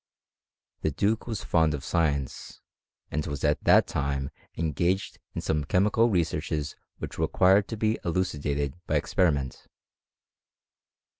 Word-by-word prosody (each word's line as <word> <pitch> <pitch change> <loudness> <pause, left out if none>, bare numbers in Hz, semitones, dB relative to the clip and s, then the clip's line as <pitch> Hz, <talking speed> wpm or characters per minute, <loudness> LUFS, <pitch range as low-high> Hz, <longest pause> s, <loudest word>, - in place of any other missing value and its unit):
The - - +1
duke 105 - 0
was 110 -4 -3
fond 80 -3 +2
of 70 - -7
science, 75 -6 -1 0.5
and 75 +1 -1
was 70 -2 -4
at 75 -1 +1
that - - +6
time 70 -1 -2 0.3
engaged 85 +4 0 0.2
in - - -2
some 75 -1 0
chemical 105 +9 +3
researches 80 -5 -1 0.2
which - - -7
required 95 +2 +4
to 115 - -5
be 110 +1 +1
eluci 85 -3 -1
dated 70 -1 -1
by - - 0
experiment. 70 -8 0
80 Hz, 130 wpm, -27 LUFS, 70-95 Hz, 0.5 s, that